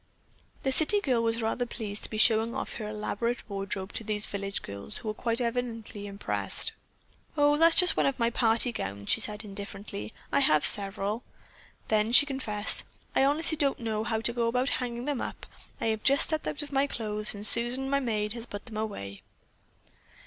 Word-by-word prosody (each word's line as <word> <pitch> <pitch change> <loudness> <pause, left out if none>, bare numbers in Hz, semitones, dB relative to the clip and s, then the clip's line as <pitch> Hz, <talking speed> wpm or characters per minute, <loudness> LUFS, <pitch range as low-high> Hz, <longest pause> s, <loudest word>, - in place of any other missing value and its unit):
The 265 - +1
city 315 +9 +4
girl 255 - +1
was 230 0 0
rather 245 +2 -1
pleased 210 -4 -6
to - - -2
be 215 - -5
showing 225 +1 +4
off - - -4
her 215 -2 -5
elaborate 215 +3 -3
wardrobe 195 -1 -5
to - - -3
these 210 -1 -1
village 200 0 -3
girls, 100 +1 -2
who 220 - -3
were 230 +2 -2
evidently 235 -3 -3
quite 205 - -6
impressed. 200 +1 -2 0.7
"Oh, 290 0 +4
that's 330 +2 +6
just 360 -3 +5
one - - +2
of 275 - -1
my 235 -2 +1
party 230 +1 +2
gowns," 100 - -4
she 225 - +4
said 210 +1 -3
indifferently. 200 - -7 0.2
"I 140 - +3
have 155 +1 +5
several." 200 +2 +1 0.7
Then 215 +1 +2
she 290 - +9
confessed: 220 -7 +1 0.3
"I - - +4
honestly 310 +3 +2
don't 280 -2 +1
know 220 -2 -2
how 220 0 -1
to 235 +1 0
go 235 -1 0
about 250 +3 +1
hanging 240 -1 -2
them 290 -3 -2
up. - - -6 0.3
I - - -3
have 220 - -6
just 275 +1 +4
stepped 315 -1 -1
out 295 - -3
of 295 - -10
my 275 +1 +2
clothes 215 -4 -1
and 205 +1 -5
Susan, 240 +4 +3
my 280 +1 +2
maid, 215 -5 -1
has 235 0 -8
put 205 0 -8
them 225 -3 -7
away." 100 - -5
225 Hz, 195 wpm, -28 LUFS, 210-250 Hz, 0.7 s, she